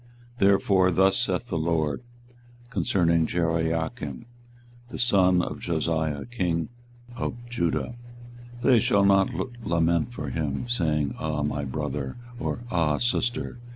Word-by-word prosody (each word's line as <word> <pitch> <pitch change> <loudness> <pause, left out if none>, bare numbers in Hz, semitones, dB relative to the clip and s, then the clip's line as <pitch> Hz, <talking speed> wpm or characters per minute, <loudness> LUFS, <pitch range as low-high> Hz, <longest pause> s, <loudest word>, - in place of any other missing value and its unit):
24:022:018 - - -19
Therefore 95 -1 +4
thus 95 +2 +4
saith - - -1
the - - -1
LORD 80 +1 0 0.7
concerning 85 -4 +2
Jehoiakim 80 -5 -1 0.6
the - - -6
son 95 -6 +4
of - - -5
Josiah 80 -3 -1
king 90 -9 -1 0.5
of - - -3
Judah; 120 -1 -1 0.7
They 125 -3 +6
shall 100 -1 +3
not 95 -1 +4 0.3
lament 85 +2 +1
for 75 - -5
him, 70 - -2
saying, 75 - 0
Ah 75 -2 -1
my 75 0 -1
brother! 70 - -4 0.2
or, 120 - -3
Ah 80 -4 +2
sister! 120 0 -1
85 Hz, 120 wpm, -26 LUFS, 80-100 Hz, 0.7 s, They